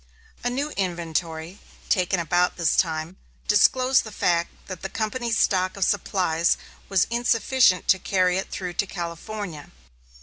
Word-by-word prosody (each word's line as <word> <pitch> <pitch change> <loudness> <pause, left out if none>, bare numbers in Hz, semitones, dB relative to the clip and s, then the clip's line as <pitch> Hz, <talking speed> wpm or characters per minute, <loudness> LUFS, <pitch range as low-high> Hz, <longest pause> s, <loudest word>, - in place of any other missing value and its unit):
A 245 - +1
new 280 +5 -2
inventory, 170 -1 -3 0.3
taken 180 -1 +2
about 175 +2 +1
this 170 -3 +2
time, 165 +1 -1 0.3
disclosed 255 +5 +4
the 215 - -9
fact 170 -3 +1 0.2
that 185 -3 -8
the 195 - -4
company's 225 +2 -2
stock 185 -1 +1
of 195 - +2
supplies 170 -4 +1 0.3
was 195 -3 +3
insufficient 235 -3 +3
to 190 - +5
carry 185 -1 +1
it 195 - -5
through 180 -2 -5
to 200 - -1
California. 170 -1 -6
185 Hz, 140 wpm, -24 LUFS, 170-215 Hz, 0.3 s, to